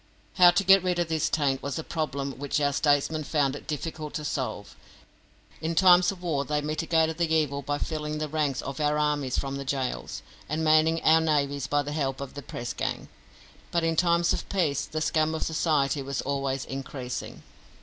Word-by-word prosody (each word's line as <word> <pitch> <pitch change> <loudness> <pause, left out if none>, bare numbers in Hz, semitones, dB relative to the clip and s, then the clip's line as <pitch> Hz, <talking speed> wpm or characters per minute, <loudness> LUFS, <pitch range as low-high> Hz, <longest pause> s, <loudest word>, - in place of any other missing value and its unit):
How 180 -1 +9
to 175 +3 +2
get 195 0 +7
rid 180 -1 0
of 175 -1 0
this 160 -1 0
taint 140 -4 0
was 140 -1 -4
a 160 - -3
problem 140 -4 -3
which 145 +1 -1
our 140 -1 +1
statesmen 150 +2 +1
found 145 -2 0
it - - -10
difficult 155 0 -5
to 150 - -4
solve. 110 -8 -4 0.9
In 165 +1 -2
times 180 0 +6
of 180 -2 -11
war 150 -5 0
they 150 +2 -1
mitigated 160 +2 0
the 170 -2 +1
evil 150 -3 +1
by 145 +1 -2
filling 150 0 -3
the 155 0 -2
ranks 150 -3 -1
of 140 0 -6
our 150 0 +1
armies 150 -3 0
from 135 0 -2
the 140 - -5
gaols, 130 - -3 0.3
and 155 +2 -1
manning 155 +1 +3
our 160 +1 +5
navies 145 -3 0
by 145 0 +1
the 145 - -5
help 135 -3 -2
of 140 -1 -7
the 145 - -7
press 120 -2 -6
gang, - - -4 0.6
but 170 -1 0
in 165 0 +1
times 170 0 +3
of - - -4
peace 150 -8 0
the 155 0 -4
scum 155 0 +1
of - - -2
society 150 -3 +1
was 135 -1 -3
always 135 -1 -2
increasing. 135 -2 -6
150 Hz, 200 wpm, -27 LUFS, 140-160 Hz, 0.9 s, How